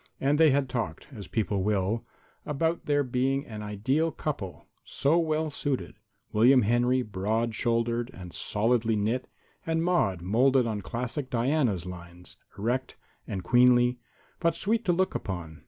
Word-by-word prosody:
And 145 +3 +2
they 160 -1 +7
had 140 0 +2
talked, 115 -11 -4
as 100 -6 -8
people 105 -2 -1
will, 105 +2 0 0.4
about 160 +3 -1
their 145 -1 +3
being 135 +2 0
an 110 -2 -7
ideal 130 +11 0
couple, 110 - -5 0.2
so 155 +5 +1
well 155 -1 0
suited 140 -2 -2 0.4
William 125 +4 +5
Henry 120 +4 +2
broad 110 +3 -1
shouldered 115 +1 0
and 90 -2 -10
solidly 115 +1 +1
knit 110 +5 -1 0.4
and 165 0 0
Maude 100 - +1
molded 125 +6 +3
on 110 -3 -2
classic 125 +6 -4
Diana's 120 - +1
lines, 90 0 -10 0.2
erect 125 +5 -2 0.3
and 95 -2 -4
queenly, 125 +2 +4 0.4
but 170 -1 +1
sweet 220 +6 0
to 180 - +3
look 185 +2 +1
upon. 85 -5 -5
120 Hz, 145 wpm, -28 LUFS, 105-140 Hz, 0.4 s, they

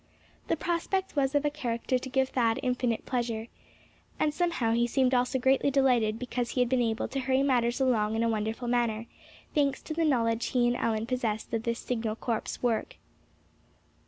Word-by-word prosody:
The - - +1
prospect 345 +4 -1
was 275 0 +1
of 290 +1 +2
a 295 - +2
character 250 -3 -1
to 260 - -7
give 265 0 +1
Thad 230 -3 +1
infinite 250 -2 0
pleasure. 235 -3 -2 0.7
And 300 -1 +1
somehow 335 -10 0
he 235 +1 +2
seemed 260 +1 +2
also 250 +1 +2
greatly 265 +2 +3
delighted 250 -6 +2
because 245 0 -3
he 255 - -2
had 250 -1 +3
been 255 -1 +2
able 225 -1 0
to 275 - -2
hurry 260 +1 +1
matters 245 -3 +2
along 220 -5 +2
in 225 - +1
a - - +2
wonderful 220 +2 -2
manner, 235 -2 0 0.5
thanks 280 -3 +1
to 315 - -5
the 330 +1 0
knowledge 235 -6 +1
he 245 -2 +2
and 240 - +1
Allan 225 -2 0
possessed 235 -3 -2
of 230 - 0
this 235 0 -2
Signal 225 -3 -2
Corps 225 -1 -3
work. 235 -3 0
245 Hz, 190 wpm, -29 LUFS, 230-265 Hz, 0.7 s, greatly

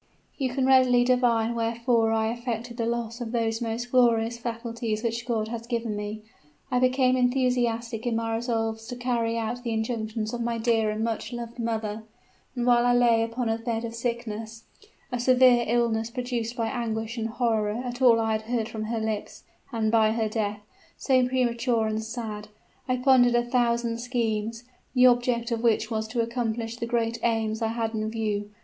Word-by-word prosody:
"You 265 -3 -1
can 255 +1 0
readily 255 -2 +5
divine 240 -2 +2
wherefore 230 0 +1
I 220 0 +1
affected 235 0 -4
the 230 -2 -1
loss 235 0 -3
of 230 -2 -4
those 225 -1 -1
most 235 +1 -3
glorious 235 -2 +3
faculties 230 -1 -3
which 230 +1 -2
God 220 -3 -1
has 230 0 -6
given 230 -3 -2
me. 210 +1 -5 0.5
I 250 - +2
became 255 0 +3
enthusiastic 245 -2 0
in 235 - 0
my 225 0 -1
resolves 225 -1 -2
to 245 - -5
carry 235 -2 -1
out 230 +2 -3
the 240 - -4
injunctions 220 -1 -2
of 240 - -3
my 235 0 -1
dear 225 -1 +2
and 215 +1 -2
much 225 0 -2
loved 240 0 -7
mother; 220 -2 -2 0.5
and 240 -1 -1
while 240 -1 +5
I 245 0 +3
lay 235 -2 +4
upon 230 +2 -2
a 225 0 0
bed 230 0 -2
of 230 - -6
sickness 230 -2 -4 0.5
a 245 - -2
severe 250 -1 +5
illness 230 -1 +1
produced 245 -1 -3
by 230 -2 -1
anguish 225 -1 -3
and 225 0 -2
horror 225 -2 0
at 245 +1 -5
all 235 -3 +6
I 225 0 0
had 215 0 0
heard 225 0 -2
from 220 -1 -4
her 225 +1 -2
lips, 220 -1 -4 0.3
and 220 -3 0
by 220 -1 +4
her 225 -1 0
death, 210 -1 -2 0.4
so 255 -2 +3
premature 240 -2 +1
and 220 0 -2
sad 220 -2 -5 0.4
I 255 0 +1
pondered 250 -2 +5
a 240 - +3
thousand 235 -1 +1
schemes, 230 -2 -2 0.3
the 250 0 +6
object 245 -1 +3
of 230 -1 -1
which 235 0 +2
was 220 -1 -1
to 235 +1 -1
accomplish 230 -1 -2
the 235 - -3
great 230 -1 0
aims 225 -1 0
I 225 - +1
had 225 0 -2
in 215 0 -2
view. 210 -2 -2
230 Hz, 185 wpm, -26 LUFS, 225-245 Hz, 0.5 s, all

